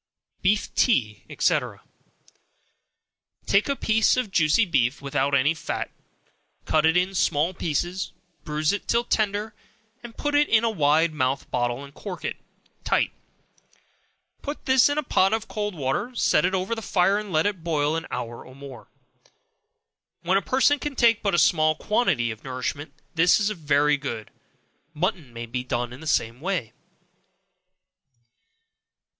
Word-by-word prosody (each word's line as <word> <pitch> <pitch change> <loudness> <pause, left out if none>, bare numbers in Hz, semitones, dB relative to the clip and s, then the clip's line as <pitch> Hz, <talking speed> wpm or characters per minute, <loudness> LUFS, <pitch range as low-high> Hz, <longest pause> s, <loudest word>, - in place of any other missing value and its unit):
Beef 205 +3 +1
Tea, 110 - +1
&c. - - +3 1.9
Take 200 +7 +2
a 280 - +1
piece 220 -2 +2
of 250 -6 -1
juicy 170 +6 +3
beef, 135 -7 +1
without 140 0 0
any 140 +4 +3
fat, 160 - -4 0.7
cut 155 0 +3
it 160 +2 +3
in 185 +2 +1
small 165 -1 +1
pieces, 175 +3 -2 0.3
bruise 150 +2 0
it 205 - -4
till 235 0 +2
tender, 215 -1 -1 0.6
put 290 0 -2
it 290 0 +3
in 225 0 +4
a 230 - +2
wide 155 -2 +2
mouthed 130 -2 -1
bottle, 120 +1 -1
and 140 0 -12
cork 190 +3 -7
it - - -3 0.5
tight; - - +1 1.3
put 290 +1 -6
this 260 +1 +5
in 290 - -1
a 300 - 0
pot 195 -6 +2
of 225 0 -2
cold 210 -2 -3
water, 150 - -2
set 180 - +3
it 185 +1 +1
over 190 +4 -1
the 225 - -4
fire, 195 0 +2
and 210 -2 -7
let 155 -1 +2
it 200 -5 -2
boil 155 -2 0
an 165 - -4
hour 120 -1 -5
or 130 - -14
more. 135 -4 -11 1.4
When 180 +2 +1
a - - -9
person 270 +5 +2
can 295 -2 -4
take 230 -3 +4
but 200 -4 +1
a - - +2
small 155 -1 +3
quantity 180 - 0
of 110 - -10
nourishment, 135 +3 -4 0.2
this 170 +4 +4
is 205 0 +1
very 150 -5 +2
good. 120 -6 -6 0.6
Mutton 160 - -2
may 115 0 -6
be 125 +2 -4
done 120 -1 -3
in 125 - -10
the 160 - -9
same 115 -3 0
way. 170 - -2
165 Hz, 155 wpm, -24 LUFS, 140-210 Hz, 1.9 s, this